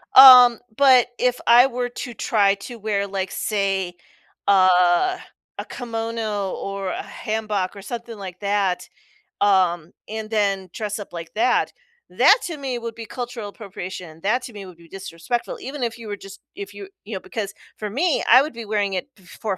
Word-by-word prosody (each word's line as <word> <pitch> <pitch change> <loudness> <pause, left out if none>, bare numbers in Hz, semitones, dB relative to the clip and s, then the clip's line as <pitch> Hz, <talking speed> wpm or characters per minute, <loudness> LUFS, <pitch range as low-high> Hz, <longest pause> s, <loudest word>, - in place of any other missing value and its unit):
Um, 250 -3 +10 0.2
but 260 -4 +6
if 250 0 +1
I 245 +3 +8
were 245 -1 -3
to 245 0 -7
try 200 -2 +2
to 235 +4 -9
wear, 205 -2 -1
like, 190 -1 -3
say, 195 -4 -1 0.5
a 185 - +4 0.4
a - - -5
kimono 225 -4 -3
or 195 -1 -4
a - - -4
hanbok 215 -4 -3
or 200 - -9
something 235 +1 -7
like 185 -2 -8
that, 200 -3 0 0.5
um, 180 -4 +2 0.2
and 220 0 -6
then 200 -3 0
dress 210 -1 -4
up 205 - -9
like 165 -1 -8
that, 240 +3 +1 0.4
that - - +6
to 330 -3 -5
me 265 -3 -3
would 230 -1 -6
be 230 - -8
cultural 240 -3 -6
appropriation, 185 -6 -8
that 240 +6 +1
to 245 - -9
me 200 -2 -8
would 180 -2 -13
be 170 0 -17
disrespectful 195 +5 -4
even 270 0 -6
if 230 -1 -2
you 230 -2 -10
were 205 - -3
just 195 0 -12 0.2
if 200 0 -8
you 200 -1 -9 0.2
you 215 +1 -8
know, - - -3
because 200 +1 -5 0.2
for 210 - -4
me, 305 - +1
I 255 +3 +9
would 300 +3 -3
be 230 -1 -7
wearing 205 -2 -1
it 185 +10 -3
f 185 -2 -21
for 200 -4 -2
210 Hz, 185 wpm, -22 LUFS, 195-240 Hz, 0.5 s, Um